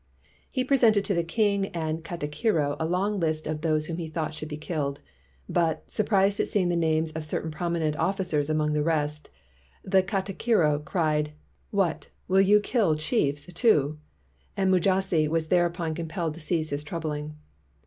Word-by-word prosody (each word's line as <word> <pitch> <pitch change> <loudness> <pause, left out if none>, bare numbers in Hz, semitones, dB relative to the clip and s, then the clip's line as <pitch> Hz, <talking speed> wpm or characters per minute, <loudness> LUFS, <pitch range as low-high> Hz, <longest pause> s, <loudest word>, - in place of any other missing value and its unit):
He 255 - -1
pre 275 +2 +3
sented 220 -5 +4
to 200 - 0
the 170 -2 +1
king 200 +2 +1
and 160 -1 -2
katikiro 155 -1 -1
a 160 - 0
long 195 +4 0
list 155 -2 -1
of 155 0 -3
those 155 -1 +1
whom 165 +1 -4
he 165 -2 -4
thought 155 -1 -3
should 155 0 -7
be 150 - -5
killed; 150 -3 -3 0.5
but, 165 -2 0
surprised 200 -1 +2
at - - +1
seeing 185 -4 +1
the 175 - +1
names 160 -1 +1
of 160 0 -5
certain 155 +1 -3
prominent 160 -1 -1
officers 170 -5 0
among 155 -1 +1
the 150 - +1
rest, 150 -1 -1 0.5
the 190 0 +4
ka 190 +1 -1
tikiro 180 -7 +1
cried: 150 -3 0 0.4
"What, 195 -5 0 0.2
will 190 +1 +4
you 205 +2 +5
kill 205 -7 +2
chiefs, 150 - 0
too?" 155 - +3 0.6
and 190 -1 +2
Mujasi 185 -3 +2
was 160 0 -1
thereupon 175 -2 +1
compelled 165 0 -3
to 165 - -11
cease 160 -1 -2
his 145 +1 -2
troubling. 150 -1 -4
165 Hz, 170 wpm, -27 LUFS, 155-190 Hz, 0.6 s, you